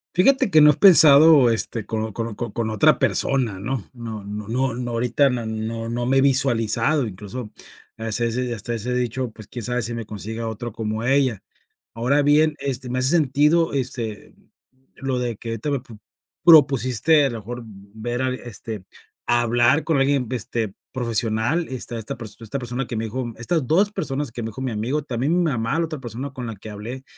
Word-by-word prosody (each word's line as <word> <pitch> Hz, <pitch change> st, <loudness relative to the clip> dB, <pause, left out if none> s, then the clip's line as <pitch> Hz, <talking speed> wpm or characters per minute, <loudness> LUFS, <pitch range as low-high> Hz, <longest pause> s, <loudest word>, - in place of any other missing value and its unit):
Fíjate 210 Hz, +5 st, +4 dB
que 155 Hz, -4 st, +5 dB
no 150 Hz, 0 st, +8 dB
he -, -, +1 dB
pensado 155 Hz, -6 st, +7 dB
este 115 Hz, -1 st, -2 dB
con 110 Hz, -1 st, -3 dB
o 110 Hz, -, -6 dB
con 115 Hz, +2 st, -3 dB
o 105 Hz, -, -8 dB, 0.2 s
con 115 Hz, -2 st, -2 dB
otra 110 Hz, -2 st, +4 dB
persona, 120 Hz, -8 st, +1 dB
¿no?, 120 Hz, +2 st, -3 dB
no 115 Hz, -4 st, -7 dB
no 105 Hz, +1 st, -7 dB
no 130 Hz, +1 st, 0 dB
no, 120 Hz, 0 st, -4 dB
ahorita 120 Hz, +4 st, +2 dB
no, 120 Hz, -3 st, -3 dB, 0.4 s
no 120 Hz, +1 st, -2 dB
me 135 Hz, +1 st, +3 dB
he 135 Hz, -, +5 dB
visualizado 130 Hz, 0 st, +2 dB
incluso 105 Hz, +3 st, -7 dB, 0.5 s
hasta 115 Hz, +1 st, -1 dB
ese 120 Hz, +1 st, -2 dB
hasta 115 Hz, +2 st, -4 dB
ese 115 Hz, +2 st, -3 dB
dicho, 125 Hz, 0 st, -2 dB
pues, 110 Hz, -1 st, -13 dB
quién 120 Hz, -, -7 dB
sabe 125 Hz, +1 st, -1 dB
si 120 Hz, -, -3 dB
me 115 Hz, -1 st, -5 dB
consiga 110 Hz, +2 st, -6 dB
otra 110 Hz, +1 st, -5 dB
como 110 Hz, +1 st, -4 dB
ella. 130 Hz, -4 st, +1 dB, 0.5 s
Ahora 125 Hz, +6 st, +1 dB
bien, 150 Hz, +1 st, +4 dB
este, 130 Hz, -2 st, -3 dB
me 130 Hz, +1 st, -1 dB
hace 130 Hz, +1 st, +3 dB
sentido, 155 Hz, +1 st, +2 dB
este, 120 Hz, -5 st, -3 dB, 0.6 s
lo 135 Hz, -1 st, -2 dB
de 120 Hz, -3 st, -2 dB
que 115 Hz, -, -7 dB
ahorita 115 Hz, +6 st, -3 dB
me 140 Hz, -, -1 dB
prop 115 Hz, -4 st, -14 dB, 0.5 s
propusiste 145 Hz, -, +5 dB
a -, -, -1 dB
lo 115 Hz, -, -5 dB
mejor 120 Hz, +4 st, -7 dB
v 115 Hz, -, -12 dB, 0.3 s
ver 120 Hz, +3 st, -3 dB
a, 130 Hz, -1 st, 0 dB
este, 110 Hz, -5 st, -8 dB, 0.4 s
hablar 120 Hz, +4 st, +3 dB
con 160 Hz, -4 st, +1 dB
alguien, 135 Hz, -1 st, +2 dB
este, 115 Hz, -4 st, -3 dB, 0.2 s
profesional. 120 Hz, +6 st, -1 dB
Esta 120 Hz, -2 st, -5 dB
esta 125 Hz, +5 st, -6 dB
pers 110 Hz, -3 st, -8 dB
esta 115 Hz, +5 st, -5 dB
persona 125 Hz, +1 st, -4 dB
que 115 Hz, -, -5 dB
me 110 Hz, -, -2 dB
dijo 120 Hz, +2 st, -4 dB
estas 140 Hz, +4 st, -1 dB
2 195 Hz, +9 st, +2 dB
personas 145 Hz, -, -3 dB
que 120 Hz, -, -6 dB
me 110 Hz, -, -4 dB
dijo 130 Hz, +5 st, -8 dB
mi 130 Hz, -3 st, -2 dB
amigo, 125 Hz, +8 st, -2 dB
también 130 Hz, +3 st, -1 dB
mi -, -, +2 dB
mamá, 135 Hz, -1 st, -1 dB
la 170 Hz, -, +1 dB
otra 155 Hz, -3 st, -7 dB
persona 125 Hz, +3 st, -6 dB
con 125 Hz, -3 st, -6 dB
la 115 Hz, -, -6 dB
que 105 Hz, +3 st, -10 dB
hablé, 115 Hz, +6 st, -7 dB
120 Hz, 200 wpm, -22 LUFS, 115-135 Hz, 0.6 s, no